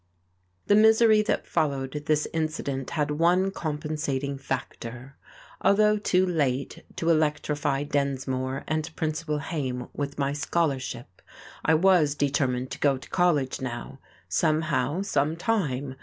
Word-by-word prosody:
The - - +3
misery 220 0 +6
that 215 - -1
followed 135 -3 -1 0.2
this 150 -1 +2
incident 155 -4 -2
had 150 -1 +1
one 175 +5 +2
compensating 150 -4 -3
factor. 130 -1 -6 0.5
Although 210 +1 +4
too 185 -2 +2
late 140 -7 -1
to 165 0 +1
electrify 145 -2 0
Densmore 135 -2 -2
and 155 +1 -2
Principal 155 -1 -2
Haime 135 -6 -4
with 140 -1 -4
my 140 -1 0
scholarship, 135 - -2 0.4
I 160 - +4
was 165 -4 +4
determined 130 -3 0
to 135 - -6
go 140 -2 +3
to 130 - -13
college 155 -9 +1
now, 125 +1 -6 0.3
somehow, 155 - +1
sometime. 155 - 0
145 Hz, 120 wpm, -26 LUFS, 135-165 Hz, 0.5 s, misery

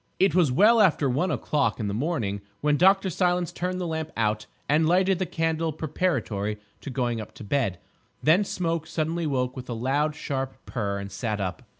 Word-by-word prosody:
It 195 +1 +3
was 175 -7 +4
well 215 - +6
after 160 -7 +4
one 145 +9 +1
o'clock 150 0 0
in 105 - -1
the 100 - -2
morning 110 - -1 0.2
when 150 0 +3
Dr. 190 +4 +4
Silence 180 0 +1
turned 180 +1 -3
the 180 - -2
lamp 160 -1 -3
out 110 -1 0 0.2
and 155 +2 +3
lighted 185 +1 +3
the 185 - -1
candle 160 0 0
preparatory 135 - -1 0.2
to - - -7
going 120 -3 -1
up 105 - -11
to - - -9
bed. 105 -4 0 0.5
Then 165 +7 +5
Smoke 165 -4 -2
suddenly 165 +1 -1
woke 125 -3 -1
with 125 -1 -8
a - - -1
loud 140 +6 0
sharp 135 -3 -3
purr 100 -5 -2
and 100 0 -6
sat 105 +1 -2
up. 95 -3 -3
150 Hz, 195 wpm, -26 LUFS, 120-170 Hz, 0.5 s, well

